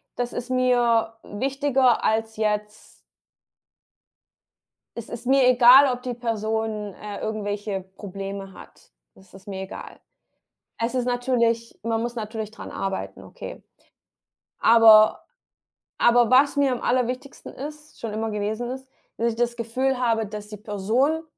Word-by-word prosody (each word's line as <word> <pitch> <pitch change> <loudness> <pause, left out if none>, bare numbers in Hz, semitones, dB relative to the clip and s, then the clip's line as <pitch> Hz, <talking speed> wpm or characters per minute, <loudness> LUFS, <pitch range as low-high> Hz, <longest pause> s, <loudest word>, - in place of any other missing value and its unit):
das 245 0 -3
ist 245 +1 -5
mir 245 -3 +2
wichtiger 265 +2 +1
als 220 0 0
jetzt 210 0 -2 2.1
es 235 - -7
ist 235 +1 -7
mir 265 -1 +4
egal, 255 +2 +7
ob 250 - -7
die 250 -1 -4
Person, 220 -3 -3
äh, 205 -1 -8
irgendwelche 205 -2 -3 0.2
Probleme 195 -1 -7
hat. - - -16 0.2
Das 190 -1 -21
ist 195 +2 -16
mir 190 -1 -5
egal. 190 - -9 0.8
Es 230 +2 -2
ist 250 -1 0
natürlich 235 -2 0
man 225 0 -1
muss 240 +1 -3
natürlich 220 -1 -5
dran 230 - -10
arbeiten, 195 -1 -5
okay. - - -9 1.0
Aber 220 -2 +6 0.7
aber 240 -1 +4
was 275 +3 +4
mir 280 -2 +3
am 245 - -5
aller 250 -1 +1
wichtigsten 255 +3 -7
ist 300 +2 -10
schon 225 - -4
immer 220 +1 -3
gewesen 215 +3 -3
ist, 265 0 -8 0.3
dass 235 +1 0
ich - - -7
das 240 0 0
Gefühl 250 +3 -1
habe, 230 -3 +1
dass 210 0 -8
die 210 - -8
Person 225 +10 0
230 Hz, 140 wpm, -24 LUFS, 215-250 Hz, 2.1 s, egal